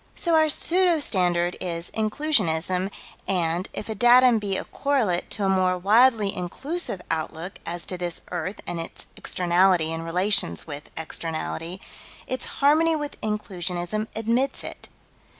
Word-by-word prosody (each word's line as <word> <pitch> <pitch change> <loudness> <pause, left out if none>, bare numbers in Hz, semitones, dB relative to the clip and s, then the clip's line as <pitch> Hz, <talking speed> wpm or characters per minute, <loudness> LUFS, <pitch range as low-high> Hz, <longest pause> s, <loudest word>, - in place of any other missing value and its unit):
So 340 - 0
our 315 -1 +5
pseudo 350 +2 +3
standard 175 -8 +1
is 170 -2 -2
Inclusionism, 190 - +1 0.4
and, 175 -1 0
if - - -6
a 220 - -2
datum 240 +2 +6
be 200 -2 -2
a - - -3
correlate 250 -11 0
to 200 - -2
a - - +2
more 185 -1 +2
widely 215 +2 +4
inclusive 205 - -4
outlook 165 +3 -4
as 175 0 -2
to 185 - -5
this 175 -1 -3
earth 180 +3 -4
and 170 - -4
its 165 - -6
externality 180 -2 +2
and 165 0 -4
relations 175 - 0
with 145 -2 -8
externality, 165 +2 -4 0.5
its 255 - -3
harmony 315 +3 +3
with 295 -1 -5
Inclusionism 195 -1 -3
admits 235 +5 0
it. - - -9
190 Hz, 140 wpm, -25 LUFS, 175-240 Hz, 0.5 s, datum